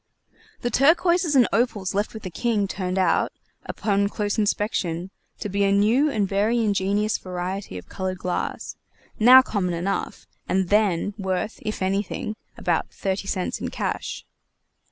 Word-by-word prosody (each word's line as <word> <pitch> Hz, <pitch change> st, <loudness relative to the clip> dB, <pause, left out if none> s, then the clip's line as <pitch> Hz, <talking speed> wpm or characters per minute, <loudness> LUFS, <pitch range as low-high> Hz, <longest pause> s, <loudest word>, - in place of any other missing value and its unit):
The 240 Hz, -, -1 dB
turquoises 335 Hz, +4 st, +3 dB
and 250 Hz, -3 st, +6 dB
opals 220 Hz, -5 st, 0 dB
left 205 Hz, +3 st, -1 dB
with 220 Hz, -, -8 dB
the 185 Hz, -, -6 dB
King 210 Hz, +2 st, 0 dB
turned 185 Hz, -1 st, -3 dB
out, 185 Hz, -, +2 dB, 0.4 s
upon 200 Hz, -1 st, 0 dB
close 210 Hz, +1 st, -2 dB
inspection, 190 Hz, -4 st, -1 dB, 0.3 s
to -, -, -3 dB
be 200 Hz, 0 st, 0 dB
a 195 Hz, -, +3 dB
new 220 Hz, +9 st, +3 dB
and 210 Hz, -7 st, 0 dB
very 205 Hz, +5 st, +1 dB
ingenious 205 Hz, -1 st, +1 dB
variety 185 Hz, -, -5 dB
of 90 Hz, -, -10 dB
colored 185 Hz, -1 st, -4 dB
glass, 180 Hz, 0 st, -3 dB, 0.4 s
now 255 Hz, +4 st, +9 dB
common 180 Hz, -8 st, -1 dB
enough, 190 Hz, +4 st, -3 dB, 0.2 s
and 190 Hz, -1 st, +1 dB
then 205 Hz, -2 st, +2 dB
worth, 190 Hz, +3 st, -2 dB
if 215 Hz, -3 st, -3 dB
anything, 195 Hz, +2 st, -2 dB, 0.2 s
about -, -, 0 dB
thirty 195 Hz, 0 st, -3 dB
cents 185 Hz, -2 st, -2 dB
in -, -, -2 dB
cash. -, -, -4 dB
200 Hz, 150 wpm, -24 LUFS, 190-220 Hz, 0.4 s, now